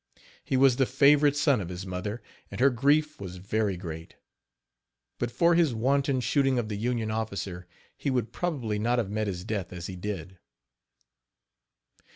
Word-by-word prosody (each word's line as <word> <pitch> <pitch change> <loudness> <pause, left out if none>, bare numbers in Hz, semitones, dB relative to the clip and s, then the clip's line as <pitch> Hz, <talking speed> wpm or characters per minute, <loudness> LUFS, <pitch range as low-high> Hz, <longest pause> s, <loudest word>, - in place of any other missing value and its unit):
He 130 - 0
was 130 -2 +5
the 135 -2 +3
favorite 145 +2 +4
son 140 -5 +3
of 90 - -6
his 90 +1 -6
mother, 95 +5 -4 0.3
and - - -8
her 135 +2 +5
grief 145 +5 +2
was 90 -2 -7
very 100 +1 -1
great. 80 -2 -8 1.0
But 120 - -1
for 170 +7 +3
his 165 -7 +3
wanton 135 +3 +1
shooting 135 +2 +2
of 115 -3 -1
the 105 - -3
Union 115 0 -1
officer, 100 -5 -4 0.3
he 140 - -3
would 120 -4 -1
probably 125 -12 -2
not 120 +3 +1
have 110 -5 -1
met 110 0 -1
his 90 -2 -4
death 100 -3 -3
as 85 -1 -7
he 95 - -6
did. 95 -2 -6
110 Hz, 170 wpm, -28 LUFS, 95-135 Hz, 1.0 s, was